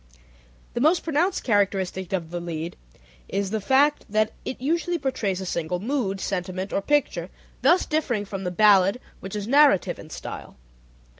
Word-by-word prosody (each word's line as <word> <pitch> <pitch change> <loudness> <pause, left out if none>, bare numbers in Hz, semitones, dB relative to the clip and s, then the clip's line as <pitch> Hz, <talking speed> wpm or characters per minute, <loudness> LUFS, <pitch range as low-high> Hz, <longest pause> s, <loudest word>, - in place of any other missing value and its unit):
The 240 - -2
most 320 +5 +3
pronounced 330 +4 0
characteristic 195 -4 0
of 170 -4 -2
the 175 - -3
lied 170 -1 -5 0.5
is 200 -1 -2
the 220 -1 -1
fact 280 +7 +3
that 215 +1 +1
it - - -4
usually 340 +6 0
portrays 245 - -2
a 190 - -5
single 175 0 -2
mood, 215 -3 -1
sentiment, 185 0 -3
or - - +1
picture, 290 +6 0 0.3
thus 365 - +4
differing 250 -9 -1
from 195 -1 -6
the 180 - -1
ballad, 200 +2 +4 0.2
which 195 +1 -7
is 205 0 -4
narrative 280 -6 +4
in - - -11
style. - - -8
205 Hz, 160 wpm, -25 LUFS, 190-275 Hz, 0.5 s, thus